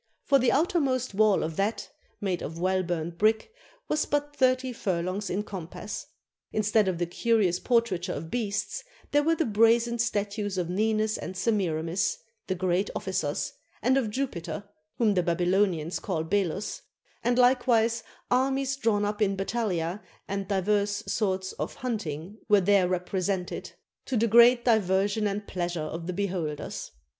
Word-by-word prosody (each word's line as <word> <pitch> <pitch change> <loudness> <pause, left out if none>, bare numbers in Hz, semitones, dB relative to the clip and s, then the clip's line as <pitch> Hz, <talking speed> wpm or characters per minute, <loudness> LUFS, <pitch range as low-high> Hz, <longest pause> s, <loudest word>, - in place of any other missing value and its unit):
For 275 - +4
the 250 -1 +3
outer 350 +2 +2
most 255 -5 0
wall 210 0 +4
of 155 0 -4
that 205 +3 -1 0.3
(made 190 -3 -1
of 160 +3 -5
well 185 +2 +1
burnt 170 -1 -3
brick) 220 - +2 0.4
was 305 - 0
but 290 0 -1
thirty 255 -1 +2
furlongs 190 -1 -2
in 200 +3 -1
compass. 185 -5 -7 0.4
Instead 215 -1 +2
of 185 -2 0
the 175 - 0
curious 190 -1 +1
por 235 +2 +4
traiture 185 -5 -3
of 160 +2 -7
beasts, 205 -4 -2 0.3
there 290 - +4
were 325 +3 +2
the 325 - 0
brazen 230 +2 +3
statues 205 -3 -1
of 175 -1 -1
Ninus 215 +2 +1
and 185 - -6
Semiramis, 180 -4 0 0.3
the 185 - 0
great 185 +2 0
ofi&cers, 155 -6 -2 0.3
and 255 +3 +4
of 260 -5 +1
Jupiter, 210 -5 -3 0.3
whom 220 -3 +3
the 185 - +2
Babylonians 175 -1 +1
call 170 -5 -2
Belus; 195 +2 -1 0.4
and 240 0 +2
likewise 240 -2 +3 0.3
armies 270 +1 +1
drawn 215 -5 +1
up 210 +1 -3
in 195 -2 +2
battalia, 195 -3 -1 0.3
and 195 -1 -3
divers 205 +1 +1
sorts 190 -3 0
of - - -3
hunting 205 - -4
were 205 -1 +7
there 195 -1 +4
represented, 185 +1 -2 0.3
to 260 - 0
the 225 - +3
great 235 +2 +6
diversion 205 -1 +2
and 205 +1 -3
pleasure 175 -3 -3
of 165 +2 -5
the 180 - -2
beholders. 175 -6 -3
205 Hz, 155 wpm, -27 LUFS, 180-230 Hz, 0.4 s, were